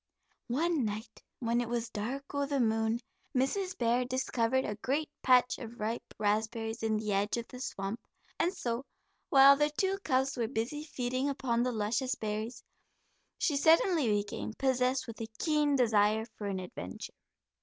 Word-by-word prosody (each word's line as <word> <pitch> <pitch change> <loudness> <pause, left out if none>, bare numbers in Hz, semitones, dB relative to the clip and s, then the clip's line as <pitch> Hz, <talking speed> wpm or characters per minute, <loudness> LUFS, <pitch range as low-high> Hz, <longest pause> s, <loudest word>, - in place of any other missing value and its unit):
One 310 +3 +1
night, 215 +1 -5 0.2
when 235 0 +1
it 235 - -4
was 235 -1 -2
"dark 265 +8 -4
o' 285 0 0
the 280 -1 0
moon," 225 0 +1 0.3
Mrs. 365 +9 0
Bear 240 +1 +2
discovered 255 0 0
a 210 - -2
great 290 +7 -1
patch 250 -1 +4
of 235 0 -9
ripe 220 +2 -4
raspberries 220 +2 -1
in 220 -1 +1
the 215 -1 -1
edge 205 +3 +1
of 235 - -4
the 250 - -9
swamp, 200 -4 -4 0.4
and 350 - +2
so 240 -8 -3 0.5
while 275 0 +8
the 295 +1 +2
two 385 +6 0
cubs 265 -1 +1
were 235 -2 0
busy 250 +6 -3
feeding 255 -1 -1
upon 250 -4 0
the 250 +1 +1
luscious 235 +4 0
berries, 220 +2 -4 0.7
she 300 - +1
suddenly 320 0 +4
became 205 +1 -1
possessed 255 0 +1
with 230 -1 -8
a 225 - -3
keen 300 -2 +2
desire 220 -3 +3
for 205 - -5
an 195 -1 -2
adventure. 95 - -7
245 Hz, 165 wpm, -31 LUFS, 220-275 Hz, 0.7 s, while